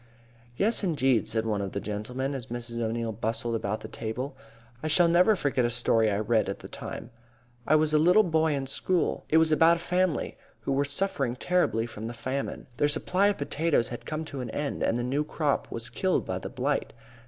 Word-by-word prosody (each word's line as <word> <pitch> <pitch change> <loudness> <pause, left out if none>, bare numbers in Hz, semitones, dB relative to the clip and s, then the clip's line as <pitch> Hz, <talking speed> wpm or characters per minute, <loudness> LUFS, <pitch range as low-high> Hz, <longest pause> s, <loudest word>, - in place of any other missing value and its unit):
"Yes, 220 +2 +2
indeed," 135 - +2
said 110 0 0
one 105 -2 0
of 100 -1 -4
the - - -1
gentlemen, 125 +7 -3
as 130 -2 -5
Mrs. 120 -1 -5
O'Neil 115 0 -1
bustled 115 +2 -2
about 110 -1 -2
the 110 - -7
table. 125 +5 -5 0.5
"I 155 - -2
shall 170 +2 +4
never 180 +6 +5
forget 140 -7 0
a 120 - +2
story 115 -2 +2
I 100 - 0
read 110 -1 +1
at 100 - -3
the - - -10
time. 115 - -7 0.6
I 155 - +5
was 155 0 +2
a 150 - +5
little 180 +7 +6
boy 160 -3 +2
in 135 -1 -2
school. 170 +5 0
It 160 - +4
was 160 0 +4
about 165 +2 +5
a - - -8
family 180 -1 0 0.2
who - - -3
were 140 +1 +2
suffering 140 -5 0
terribly 125 -8 +1
from 110 -1 -7
the 120 - -6
famine. 130 +4 -4
Their 145 - +3
supply 180 +6 +2
of 205 - +1
potatoes 145 -4 0
had 120 - -7
come 155 +1 -3
to 140 -4 -6
an 125 - -5
end 145 +4 -3
and 115 - +1
the 120 - -1
new 135 +4 0
crop 150 -1 -1
was 115 0 -3
killed 185 +10 0
by - - -3
the - - -6
blight. - - -1
135 Hz, 215 wpm, -28 LUFS, 115-160 Hz, 0.6 s, little